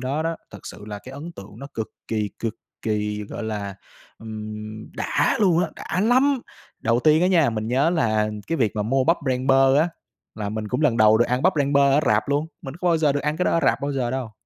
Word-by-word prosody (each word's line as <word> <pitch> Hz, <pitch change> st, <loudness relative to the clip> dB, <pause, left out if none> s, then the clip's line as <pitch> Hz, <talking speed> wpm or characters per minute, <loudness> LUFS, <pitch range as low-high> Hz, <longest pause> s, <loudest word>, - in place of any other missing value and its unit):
đó 135 Hz, +4 st, -1 dB
đó, 165 Hz, 0 st, -2 dB
thật -, -, -10 dB
sự 105 Hz, -, -9 dB
là 105 Hz, -1 st, -6 dB
cái 130 Hz, +5 st, -12 dB
ấn 150 Hz, +5 st, -8 dB
tượng 100 Hz, -4 st, -12 dB
nó 140 Hz, -, -7 dB
cực 110 Hz, -1 st, -3 dB, 0.2 s
kỳ, 105 Hz, -2 st, -1 dB
cực 115 Hz, -2 st, -3 dB, 0.3 s
kỳ, 105 Hz, -1 st, -1 dB
gọi -, -, -6 dB
là, 105 Hz, -3 st, -4 dB, 0.4 s
ừm, 110 Hz, 0 st, -7 dB
đã -, -, +1 dB
luôn 180 Hz, -5 st, +4 dB
á, -, -, -6 dB
đã 180 Hz, -, -3 dB
lắm! 255 Hz, +5 st, +3 dB, 0.4 s
Đầu 115 Hz, +2 st, +2 dB
tiên 155 Hz, +3 st, +4 dB
á -, -, +4 dB
nha, 165 Hz, -8 st, +4 dB
mình 110 Hz, -1 st, -3 dB
nhớ 135 Hz, +7 st, +2 dB
là 110 Hz, -10 st, +1 dB, 0.2 s
cái 165 Hz, -, -1 dB
việc 110 Hz, -7 st, 0 dB
mà 105 Hz, -, +1 dB
mua 130 Hz, +5 st, +1 dB
bắp 165 Hz, +4 st, +4 dB
rang 130 Hz, 0 st, 0 dB
bơ 135 Hz, 0 st, +5 dB
á, 160 Hz, +3 st, +3 dB, 0.5 s
là 105 Hz, -2 st, -4 dB
mình 110 Hz, 0 st, -4 dB
cũng 125 Hz, +6 st, -1 dB
lần 145 Hz, -7 st, +3 dB
đầu 110 Hz, 0 st, +6 dB
được 120 Hz, -, +5 dB
ăn 125 Hz, +2 st, 0 dB
bắp 185 Hz, +3 st, +4 dB
rang 140 Hz, -1 st, +1 dB
bơ 140 Hz, -, +5 dB
ở 145 Hz, -, +4 dB
rạp -, -, +2 dB
luôn, 145 Hz, +2 st, +1 dB, 0.2 s
mình 135 Hz, 0 st, -7 dB
có 180 Hz, +1 st, -1 dB
bao 170 Hz, -, +4 dB
giờ 155 Hz, -3 st, +2 dB
được 145 Hz, -, -1 dB
ăn 150 Hz, +1 st, -1 dB
cái 180 Hz, -, 0 dB
đó -, -, +2 dB
ở 165 Hz, -, +2 dB
rạp -, -, +2 dB
bao 140 Hz, 0 st, -1 dB
giờ 125 Hz, -3 st, -1 dB
đâu. 130 Hz, -3 st, -4 dB
130 Hz, 255 wpm, -23 LUFS, 110-155 Hz, 0.5 s, đầu